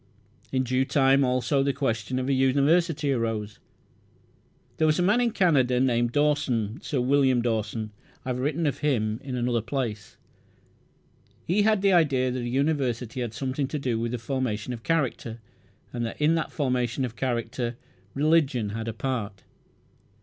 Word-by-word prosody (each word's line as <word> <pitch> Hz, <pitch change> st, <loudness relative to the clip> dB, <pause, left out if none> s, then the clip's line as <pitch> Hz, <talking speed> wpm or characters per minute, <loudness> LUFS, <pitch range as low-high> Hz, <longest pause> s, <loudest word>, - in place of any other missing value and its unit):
In 130 Hz, -1 st, +1 dB
due 130 Hz, +1 st, +1 dB
time 135 Hz, 0 st, +3 dB
also 130 Hz, +2 st, +1 dB
the 140 Hz, 0 st, +1 dB
question 125 Hz, -3 st, -2 dB
of 130 Hz, 0 st, -2 dB
a 140 Hz, -, +2 dB
University 145 Hz, +3 st, +2 dB
arose. 110 Hz, -4 st, -3 dB, 1.2 s
There 155 Hz, -, +3 dB
was 155 Hz, -, +3 dB
a 180 Hz, -, +2 dB
man 210 Hz, +7 st, +3 dB
in 240 Hz, -, +2 dB
Canada 145 Hz, -, +2 dB
named 120 Hz, -2 st, +2 dB
Dawson 140 Hz, -6 st, 0 dB
Sir 140 Hz, -, -2 dB
William 130 Hz, -1 st, +3 dB
Dawson. 110 Hz, -2 st, -2 dB, 0.3 s
I -, -, -4 dB
have 125 Hz, 0 st, -2 dB
written 150 Hz, +5 st, -1 dB
of 140 Hz, -2 st, -1 dB
him 115 Hz, -7 st, 0 dB
in 135 Hz, -2 st, -4 dB
another 120 Hz, -1 st, 0 dB
place. 115 Hz, -4 st, -4 dB, 1.3 s
He 190 Hz, +5 st, +2 dB
had 215 Hz, -1 st, +2 dB
the 195 Hz, -1 st, +4 dB
idea 135 Hz, -7 st, +3 dB
that 125 Hz, 0 st, -3 dB
a 120 Hz, -, -3 dB
university 130 Hz, -3 st, -1 dB
had 115 Hz, -2 st, -4 dB
something 135 Hz, +1 st, -2 dB
to 150 Hz, -, -3 dB
do 125 Hz, -5 st, -1 dB
with 115 Hz, 0 st, -2 dB
the -, -, -1 dB
formation 125 Hz, -2 st, -3 dB
of 115 Hz, -, -7 dB
character, 125 Hz, -6 st, -1 dB, 0.5 s
and 120 Hz, -1 st, -2 dB
that -, -, -8 dB
in 150 Hz, +2 st, +3 dB
the 165 Hz, -1 st, 0 dB
formation 125 Hz, -2 st, -1 dB
of 120 Hz, -2 st, -7 dB
character 120 Hz, 0 st, -2 dB, 0.4 s
religion 140 Hz, -7 st, +2 dB
had 110 Hz, +2 st, -5 dB
a 115 Hz, -, -3 dB
part. 110 Hz, -5 st, -4 dB
130 Hz, 165 wpm, -26 LUFS, 120-145 Hz, 1.3 s, the